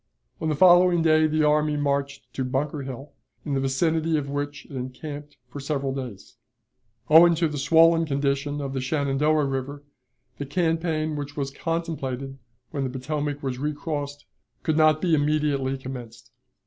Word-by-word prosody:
On 160 - 0
the 155 - +1
following 175 +1 +6
day 155 -1 +4
the 155 0 +1
army 150 0 +2
marched 140 -1 -2
to 135 - -2
Bunker 140 +3 -2
Hill, 135 +1 -8 0.3
in 145 - -2
the 135 - +1
vicinity 160 +4 +1
of 140 -2 -3
which 145 +1 -4
it - - -18
encamped 145 +3 -7
for 135 +3 -8
several 140 -1 -2
days. 125 -8 -8 0.7
Owing 165 +2 +7
to 165 +1 +1
the 150 -2 -4
swollen 165 +3 +5
condition 140 0 -1
of 135 -1 -4
the 135 - -2
Shenandoah 145 +2 +1
River, 135 +1 -4 0.6
the 145 - -3
campaign 160 0 0
which 145 0 -6
was 140 -1 -2
contemplated 135 -5 -4 0.3
when 140 -3 -2
the 130 - -1
Potomac 145 +2 -3
was 130 -2 -3
recrossed, 145 -1 -4 0.4
could 160 - +1
not 155 -1 +4
be 175 -3 +2
immediately 145 -3 +1
commenced. 125 -2 -9
145 Hz, 160 wpm, -25 LUFS, 135-155 Hz, 0.7 s, Owing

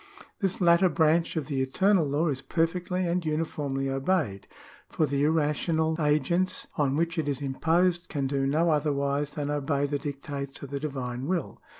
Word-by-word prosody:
^ - - -15 0.2
This 190 -3 -1
latter 175 +1 +5
branch 165 +1 +2
of 155 - -1
the 135 -2 -2
eternal 185 +5 +2
law 150 +4 +1
is 135 -2 -2
perfectly 180 +2 -1
and 175 +1 0
uniformly 150 -3 -2
obeyed; 135 - -1 0.4
for 155 - +1
the 140 0 0
irrational 160 +1 +1
agents 165 +5 +1
on 140 -3 +1
which 165 +2 0
it 155 - -1
is 140 -2 -1
imposed 165 +6 +1
can 140 -3 -2
do 135 0 0
no 160 +4 +2
otherwise 145 -1 0
than 145 -1 -2
obey 145 -1 0
the 145 0 -2
dictates 140 -1 -5
of 140 - -8
the 140 - -2
divine 130 -3 -4
will. 175 -1 -2
150 Hz, 175 wpm, -27 LUFS, 140-170 Hz, 0.4 s, latter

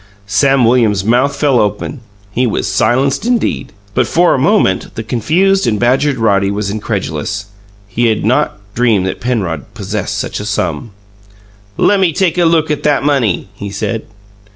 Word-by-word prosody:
Sam 130 +5 +3
Williams's 110 -5 +2
mouth 125 +5 +2
fell 140 -3 +2
open; 105 +6 -2 0.3
he 125 +3 +1
was 110 - -1
silenced 120 +7 +1
indeed. 240 0 -1 0.2
But - - +1
for 175 +1 +3
a - - 0
moment, 145 - +1
the 115 - -4
confused 170 - +1
and 105 -3 0
badgered 130 +3 +2
Roddy 100 -4 +2
was 100 0 -2
incredulous; 100 -2 -3 0.4
he 115 +4 0
had 110 -2 0
not 130 +2 +1 0.2
dreamed 115 -6 +2
that 95 - -4
Penrod 95 - -3
possessed - - -3
such - - -3
a 105 - -5
sum. 90 -3 -2 0.9
"Lemme 190 -5 +3
take 180 0 +1
a 175 - +4
look 160 -2 +2
at 150 -1 -1
that 145 -2 +1
money!" 125 -10 0
he 100 +1 -7
said. 110 +2 -3
120 Hz, 160 wpm, -14 LUFS, 105-145 Hz, 0.9 s, a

